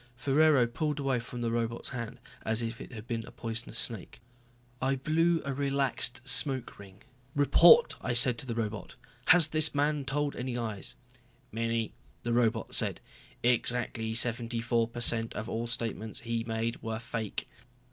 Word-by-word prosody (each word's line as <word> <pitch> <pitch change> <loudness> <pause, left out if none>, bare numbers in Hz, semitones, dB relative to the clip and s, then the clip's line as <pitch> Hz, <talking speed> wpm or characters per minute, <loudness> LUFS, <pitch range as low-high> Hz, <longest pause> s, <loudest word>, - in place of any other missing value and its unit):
Ferraro 140 +1 +4
pulled 150 +5 -2
away 135 -3 0
from 120 +1 -7
the 115 -1 -1
robot's 115 0 -2
hand 120 -1 -6 0.2
as 110 +1 0
if 115 +1 -5
it - - -9
had 110 -3 -9
been 115 -2 -3
a - - -10
poisonous 115 +1 -4
snake. 115 -6 -1 0.6
I 135 +1 +1
blew 165 +5 +1
a 140 - -2
relaxed 135 -2 -1
smoke 130 0 +1
ring. 100 0 -14 0.3
"Report," 170 +10 +6
I 120 - -1
said 120 0 +5
to 135 - -3
the 115 - -3
robot. 110 -3 -4 0.3
"Has 170 -3 +7
this 155 -1 +2
man 145 0 +1
told 145 +2 -1
any 125 -1 -4
lies?" 110 -5 -4 0.6
"Many," 115 0 -2 0.3
the 120 - -1
robot 115 -2 +1
said. - - +2 0.4
"Exactly 120 -2 +1
seventy 115 0 +1
four 115 0 +1
per 120 +1 -7
cent 115 -1 0
of 110 - -4
all 115 0 -3
statements 115 -1 -3
he 115 -1 -2
made 115 0 -2
were 110 0 -3
fake." 115 -2 -4
120 Hz, 165 wpm, -30 LUFS, 115-135 Hz, 0.6 s, Has